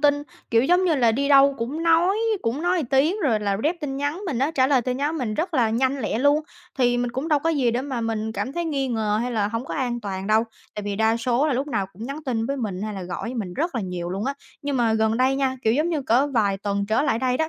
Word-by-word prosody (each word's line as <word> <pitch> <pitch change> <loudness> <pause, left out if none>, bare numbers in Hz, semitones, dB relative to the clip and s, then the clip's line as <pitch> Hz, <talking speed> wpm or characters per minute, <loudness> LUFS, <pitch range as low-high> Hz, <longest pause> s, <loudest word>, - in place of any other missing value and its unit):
tin, 290 0 +3 0.3
kiểu, 230 0 +4
giống 355 +6 +3
như 335 - +3
là, 235 -5 +3
đi 280 +4 0
đâu 275 0 +6
cũng 265 +8 -3
nói 335 +4 +4 0.3
cũng 240 +8 -1
nói 355 -1 +1
tiếng 290 +8 +3
rồi 225 -7 +2
là 200 -1 0
rep 330 +4 +1
tin 275 -3 -3
nhắn 285 +5 -2
mình 285 -9 -2
á, 275 +4 +1
trả 260 -5 +2
lời 265 -3 +3
tin 250 +1 -2
nhắn 295 +4 -1
mình 220 -5 -2
rất 345 - -2
là 235 -5 +3
nhanh 260 +4 +1
lẹ 220 -2 -2
luôn. 285 +3 +4 0.4
Thì 245 -1 +3
mình 245 0 -1
cũng 265 +7 -3
đâu 300 - +3
có 325 +3 0
gì 270 -7 +2
để 240 +2 -1
mà 265 -4 -3
mình 220 -1 -2
cảm 205 +5 -3
thấy 345 +3 -2
nghi 280 -5 -1
ngờ 215 -3 0
hay 245 0 -3
là 210 -3 +1
hông 230 +3 -3
có - - -5
an 245 -4 -2
toàn 195 -2 -5
đâu 215 +2 +3 0.3
tại 210 - -4
vì 205 0 -3
đa 220 +1 +2
số 245 +4 +1
là 300 - +1
lúc 265 +3 -1
nào 215 -9 -1
cũng 210 +6 -9
nhắn 285 +3 -6
tin 230 -4 -1
với 275 +2 -2
mình 205 -6 -3
hay 215 0 -4
là 190 - -5
gọi 180 0 -5
với 255 - -5
mình 190 -6 -4
rất - - -11
rất - - -25
là 235 - 0
nhiều 180 -3 -4
luôn 195 +3 -3
á. 275 - -1 0.3
Nhưng 285 -1 -1
mà 230 -3 +2
gần 220 0 +1
đây 260 +2 +2
nha, 265 -1 0
kiểu, 220 - +4
giống 305 +7 +1
như 305 -4 -1
cỡ 260 +2 +3
vài 200 -4 +2
tuần 200 0 -2
trở 220 +5 +2
lại 275 -6 +1
đây 255 0 +1
đó, 315 +2 0
255 Hz, 300 wpm, -23 LUFS, 220-285 Hz, 0.4 s, đâu